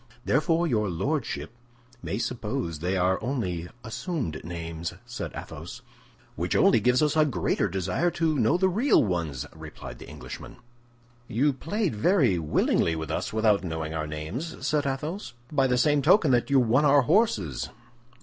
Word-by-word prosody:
"Therefore 165 +4 +2
your 110 - +1
lordship 135 - -2 0.5
may 100 - -3
suppose 115 - -3
they 90 +4 -1
are 90 +1 +2
only 100 -9 -2 0.2
assumed 115 - -4
names," 85 0 -5
said 120 0 -5
Athos. - - -8 0.5
"Which - - -1
only 115 - +5
gives 125 +6 +3
us 150 +1 +2
a 155 - +5
greater 110 - 0
desire 95 - 0
to 160 -4 +1
know 135 +10 +3
the 190 +1 +3
real 225 +10 +3
ones," 85 - -2
replied - - -9
the - - -11
Englishman. - - -9 0.7
"You 135 +7 +2
played 175 - -2
very 125 - +3
willingly 80 +1 +1
with 80 -1 -4
us - - -2
without 110 -2 +2
knowing 80 -2 -4
our 80 -1 -2
names," 80 - -5
said 150 -1 +1
Athos, 150 +9 -4 0.2
"by 135 -3 +3
the 125 -1 +2
same 145 +2 +3
token 160 0 +5
that 120 +1 +2
you 140 -1 +5
won 125 +3 +3
our 145 -1 +5
horses." 120 - +1
120 Hz, 160 wpm, -27 LUFS, -, 0.7 s, only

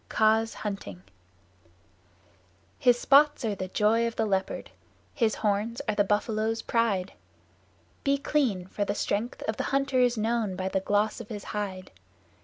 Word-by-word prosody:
Kaa's 220 +1 +2
Hunting 150 - -6 1.8
His 245 -2 +4
spots 290 -1 +4
are 215 - 0
the 185 -1 -4
joy 220 +4 +2
of 230 - -5
the 220 - 0
Leopard: 195 -2 -2 0.4
his 225 -5 +1
horns 215 +2 -1
are - - +1
the 205 0 +3
Buffalo's 215 +2 0
pride. 205 -5 0 0.9
Be 280 -1 +2
clean, 260 -11 0
for 205 +2 -3
the 205 0 -2
strength 220 +5 -2
of 220 - -1
the - - -2
hunter 275 -1 +1
is 245 -1 +3
known 220 -3 0
by 185 +1 -2
the 190 - 0
gloss 205 +4 0
of 220 - -11
his 205 -3 -6
hide. 190 -3 -4
215 Hz, 155 wpm, -27 LUFS, 200-235 Hz, 1.8 s, His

